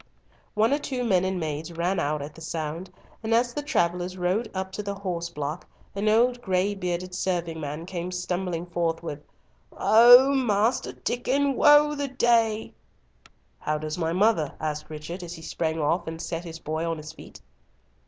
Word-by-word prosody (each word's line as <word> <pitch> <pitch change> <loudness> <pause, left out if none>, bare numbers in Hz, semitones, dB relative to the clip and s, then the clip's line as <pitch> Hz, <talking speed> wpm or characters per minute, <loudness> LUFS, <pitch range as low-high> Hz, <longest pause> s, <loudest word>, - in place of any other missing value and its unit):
One 220 +5 +3
or 290 - +1
two 260 -4 -3
men 190 -6 +2
and 190 -1 -1
maids 155 0 -4
ran 175 +3 -1
out 150 0 -1
at 145 +1 -8
the 165 - -14
sound, 160 +2 -4 0.3
and 225 0 +1
as 240 +1 +2
the 295 - -2
travellers 180 - -1
rode 185 +6 0
up 190 0 -4
to 195 - -4
the 200 -1 -4
horse 180 -4 -4
block, 150 0 -5 0.3
an 205 +2 0
old 240 +3 +3
gray 190 +1 +1
bearded 180 -1 -3
serving 175 -3 -2
man 150 +2 -5
came 180 -1 -5
stumbling 180 -1 -2
forth 170 -1 -2
with 150 -3 -5 0.5
"Oh! 245 +6 +7
Master 230 -3 +1
Diccon, 275 +3 0
woe 295 +3 +6
worth 295 -1 -5
the 285 - -1
day!" 230 -4 +1 0.9
"How 155 0 -1
does 155 0 -4
my 165 -1 0
mother?" 180 -5 +2
asked 150 0 -4
Richard, 155 +4 -7
as 175 0 -7
he 160 - -11
sprang 160 0 -2
off 165 +3 0
and 160 0 -5
set 165 0 -4
his 165 -1 -7
boy 160 0 -3
on 165 -1 -1
his 155 +1 -9
feet. - - -13
180 Hz, 185 wpm, -26 LUFS, 165-220 Hz, 0.9 s, Oh